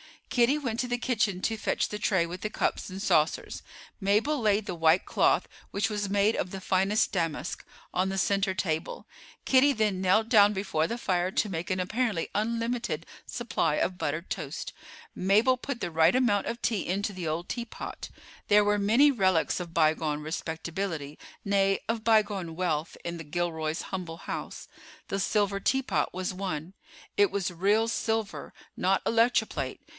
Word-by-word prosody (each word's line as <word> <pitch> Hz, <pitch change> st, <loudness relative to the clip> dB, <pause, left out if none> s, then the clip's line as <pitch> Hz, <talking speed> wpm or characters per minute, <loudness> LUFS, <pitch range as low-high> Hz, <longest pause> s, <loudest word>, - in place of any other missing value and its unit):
Kitty 245 Hz, +4 st, +3 dB
went 240 Hz, -6 st, -3 dB
to 250 Hz, -, 0 dB
the 245 Hz, 0 st, -1 dB
kitchen 215 Hz, -7 st, 0 dB
to 225 Hz, +2 st, -1 dB
fetch -, -, -1 dB
the 210 Hz, -, -5 dB
tray 190 Hz, -5 st, +2 dB
with 175 Hz, +2 st, -6 dB
the 215 Hz, -, -3 dB
cups -, -, -1 dB
and 190 Hz, +1 st, -6 dB
saucers; 155 Hz, -6 st, +1 dB, 0.4 s
Mabel 215 Hz, +9 st, +2 dB
laid 210 Hz, -2 st, +2 dB
the -, -, -3 dB
white 165 Hz, +1 st, +3 dB
cloth, -, -, +2 dB, 0.3 s
which 200 Hz, +1 st, 0 dB
was 205 Hz, -2 st, -2 dB
made 205 Hz, +2 st, +2 dB
of 185 Hz, -, -2 dB
the 195 Hz, -, -6 dB
finest 195 Hz, +3 st, +2 dB
damask, 165 Hz, -3 st, -2 dB, 0.3 s
on 185 Hz, +1 st, +1 dB
the 195 Hz, -, -3 dB
center 195 Hz, 0 st, +1 dB
table. 160 Hz, -3 st, -2 dB, 0.4 s
Kitty 270 Hz, +2 st, +5 dB
then 215 Hz, -5 st, 0 dB
knelt 215 Hz, +4 st, +3 dB
down 205 Hz, -2 st, +6 dB
before 190 Hz, -5 st, 0 dB
the 235 Hz, -, -3 dB
fire 180 Hz, -5 st, 0 dB
to 210 Hz, -, 0 dB
make 165 Hz, -2 st, -4 dB
an 185 Hz, 0 st, 0 dB
apparently 215 Hz, -2 st, -1 dB
unlimited 230 Hz, -6 st, -1 dB, 0.2 s
supply 220 Hz, -10 st, -1 dB
of 180 Hz, +3 st, -1 dB
buttered 155 Hz, +4 st, -3 dB
toast; 155 Hz, -4 st, -4 dB, 0.4 s
Mabel 215 Hz, +7 st, +3 dB
put 250 Hz, -1 st, -5 dB
the -, -, -2 dB
right 160 Hz, +4 st, +4 dB
amount 235 Hz, -6 st, +2 dB
of 235 Hz, +1 st, -4 dB
tea 215 Hz, -5 st, 0 dB
into 200 Hz, +3 st, -1 dB
the 180 Hz, -3 st, -5 dB
old 165 Hz, +3 st, -3 dB
teapot. 235 Hz, -1 st, -6 dB, 0.4 s
There 210 Hz, 0 st, +6 dB
were 205 Hz, 0 st, +2 dB
many 235 Hz, +9 st, +5 dB
relics 190 Hz, -10 st, +2 dB
of 170 Hz, -2 st, -7 dB
bygone 155 Hz, -2 st, +1 dB
respectability, 160 Hz, 0 st, -4 dB, 0.2 s
nay, 195 Hz, -1 st, +2 dB
of 225 Hz, -1 st, -2 dB
bygone 205 Hz, -7 st, +2 dB
wealth, 165 Hz, -3 st, -1 dB
in 170 Hz, 0 st, -4 dB
the 165 Hz, -, -8 dB
Gilroys' 160 Hz, 0 st, -2 dB
humble 175 Hz, -4 st, -4 dB
house. -, -, -6 dB, 0.4 s
The 195 Hz, -, -1 dB
silver 200 Hz, 0 st, +1 dB
teapot 205 Hz, -, 0 dB
was 185 Hz, +1 st, -3 dB
one—it 190 Hz, -, -3 dB
was 195 Hz, -, -2 dB
real 205 Hz, +6 st, +2 dB
silver, 220 Hz, -2 st, -2 dB, 0.2 s
not 190 Hz, +1 st, +1 dB
electroplate. 230 Hz, +2 st, +1 dB
195 Hz, 165 wpm, -28 LUFS, 170-220 Hz, 0.4 s, down